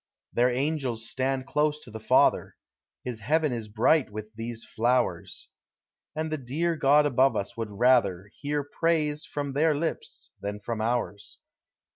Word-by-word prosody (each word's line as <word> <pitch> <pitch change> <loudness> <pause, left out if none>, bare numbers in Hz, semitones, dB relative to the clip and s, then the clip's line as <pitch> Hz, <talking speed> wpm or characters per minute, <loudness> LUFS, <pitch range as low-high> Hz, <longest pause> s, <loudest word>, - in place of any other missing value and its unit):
Their 125 +1 +3
angels 130 -4 -1
stand 130 +2 -1
close 150 +2 +1
to 120 - -12
the 110 - -7
Father; - - +3 0.5
His 125 -3 -5
heaven 150 +5 +1
is 115 -2 -4
bright 120 +7 +3
with 110 +1 -7
these 115 +1 -6
flowers; 120 +3 -1 0.7
And 155 0 -2
the 155 - -2
dear 155 +7 -1
(lod 145 +2 +5
above 130 -2 +3
us 100 - -3
would 115 -2 -4
rather 100 -4 +2
Hear 145 0 -1
praise 150 0 0
from 145 -2 -4
their 155 +2 +3
lips 160 +3 -4
than 100 +1 -4
from 110 +1 -4
ours. 115 -3 -2
130 Hz, 150 wpm, -27 LUFS, 115-150 Hz, 0.7 s, lod